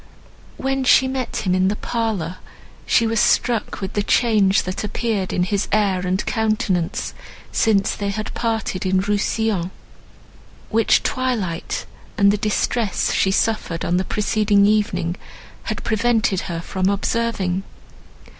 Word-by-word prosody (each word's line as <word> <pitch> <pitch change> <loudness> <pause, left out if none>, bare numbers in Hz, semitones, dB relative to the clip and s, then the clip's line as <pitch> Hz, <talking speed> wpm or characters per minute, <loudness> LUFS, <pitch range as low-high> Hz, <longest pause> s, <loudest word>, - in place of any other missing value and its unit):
When 270 0 -1
she 260 +1 +5
met 260 -4 -3
him 180 - +2
in 185 0 +3
the 205 - 0
parlour, 210 -8 -2 0.5
she 230 - +4
was 225 0 +1
struck 235 -1 +1
with 190 0 -4
the 205 - +1
change 205 -3 +3
that 185 +3 -4
appeared 210 -2 -2
in 180 - +1
his 200 +2 -1
air 200 -3 +2
and 185 +2 0
countenance 215 -6 -1 0.4
since 200 -3 +2
they 200 -1 -3
had 215 +2 -4
parted 225 -5 -2
in 185 0 +2
Rousillon, 205 -2 0 1.0
which 225 0 +3
twilight 225 -10 -2 0.3
and 200 0 +5
the 210 - 0
distress 210 0 0
she 190 - +2
suffered 195 -4 0
on 175 - +1
the 185 - +1
preceding 210 0 +2
evening 205 -4 +1 0.5
had - - -4
prevented 220 -3 +1
her 165 -1 -3
from 185 +2 -1
observing. 200 -2 -1
205 Hz, 135 wpm, -21 LUFS, 190-225 Hz, 1.0 s, she